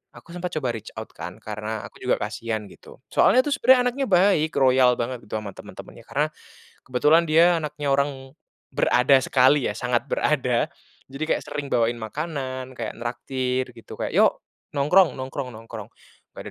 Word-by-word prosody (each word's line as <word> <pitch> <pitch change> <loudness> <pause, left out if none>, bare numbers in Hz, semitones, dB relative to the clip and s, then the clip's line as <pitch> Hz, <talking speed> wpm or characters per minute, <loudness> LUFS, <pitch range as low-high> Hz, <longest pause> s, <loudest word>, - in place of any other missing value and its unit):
aku 170 - -14
sempat 180 0 -3
coba 130 -6 -1
reach 110 - -8
out - - -7
kan - - -7
karena 110 0 -5
aku - - -19
juga 125 - +2
kasihan 110 +1 -3
gitu - - -16
soalnya 255 - +5
tuh 290 - -1
sebenarnya 260 -1 +5
anaknya 270 +2 -2
baik 180 -4 +4
royal 130 -2 +5
banget 120 +1 -3
gitu 110 - -5
ama 105 -2 -7
temen-temennya - - -12
karena, - - +1 0.6
kebetulan 150 +6 +4
dia 170 +3 +5
anaknya 150 -1 -4
orang, 135 -1 -1 0.4
berada 130 +2 +4
sekali 130 +1 +4
ya - - -2
sangat 125 +3 -1
berada, 125 -5 +1 0.4
jadi 135 +3 -4
kayak - - -4
sering 145 -1 -4
bawain 120 0 +2
makanan 130 +1 -5
kayak 115 -3 -5
nraktir 125 +1 -2
gitu 115 - -11
kayak, - - -2
"Yok - - +3 0.3
nongkrong 160 +6 +4
nongkrong 130 0 -5
nongkrong," 110 -1 -9 0.5
"gak - - -7
130 Hz, 165 wpm, -24 LUFS, 120-150 Hz, 0.6 s, soalnya